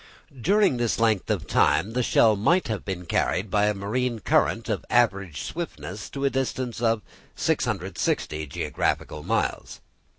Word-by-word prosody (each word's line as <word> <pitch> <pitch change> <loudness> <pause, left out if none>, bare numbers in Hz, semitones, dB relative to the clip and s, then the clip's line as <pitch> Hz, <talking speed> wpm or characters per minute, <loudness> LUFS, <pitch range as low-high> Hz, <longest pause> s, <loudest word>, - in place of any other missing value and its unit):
During 195 - +3
this 120 -2 0
length 110 -4 +2
of - - 0
time 105 - +2
the 125 - +1
shell 115 -2 +4
might 165 - +2
have 110 -2 -2
been 90 -2 -5
carried 95 +3 0
by 105 0 +3
a 105 - +1
marine 115 +5 -1
country 105 - +1
of - - -5
average 100 - +1
swiftness 95 +2 -6
to 140 0 -3
a - - +4
distance 130 -3 -2
of 115 -2 +1 0.3
660 75 0 -1
geographical 75 +2 -2
miles. - - -2
110 Hz, 145 wpm, -25 LUFS, 100-125 Hz, 0.3 s, shell